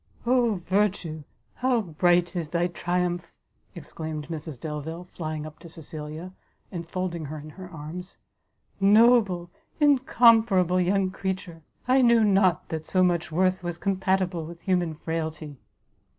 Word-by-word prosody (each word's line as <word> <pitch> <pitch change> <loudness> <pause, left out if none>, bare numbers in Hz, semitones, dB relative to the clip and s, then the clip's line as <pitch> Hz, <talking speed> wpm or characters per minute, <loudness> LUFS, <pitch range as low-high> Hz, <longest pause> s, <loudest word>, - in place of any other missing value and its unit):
"Oh 235 -7 +2
Virtue, 190 -5 0 0.3
how 250 -2 +1
bright 175 0 +2
is 165 -4 -3
thy 170 +1 +1
triumph!" 175 0 -2 0.4
exclaimed 155 -2 -6
Mrs 155 -4 -6
Delvile, 160 +3 -5
flying 155 -3 -5
up 155 -1 -10
to 170 0 -12
Cecilia, 160 +2 -8 0.4
and 170 -2 -6
folding 175 -3 -3
her 155 +2 -6
in 155 +1 -9
her 185 +3 -10
arms; 175 +3 -8 0.6
"Noble, 200 -4 +4 0.3
incomparable 230 - +4
young 190 +1 +1
creature! 190 -3 -4 0.3
I 260 +1 +5
knew 235 -2 +5
not 195 -3 +3
that 160 -1 -5
so 185 -1 +3
much 170 -2 +1
worth 185 +3 +1
was 175 -1 -4
compatible 190 -3 0
with 165 +2 -9
human 180 -4 0
frailty!" 160 -2 -4
175 Hz, 135 wpm, -26 LUFS, 160-190 Hz, 0.6 s, I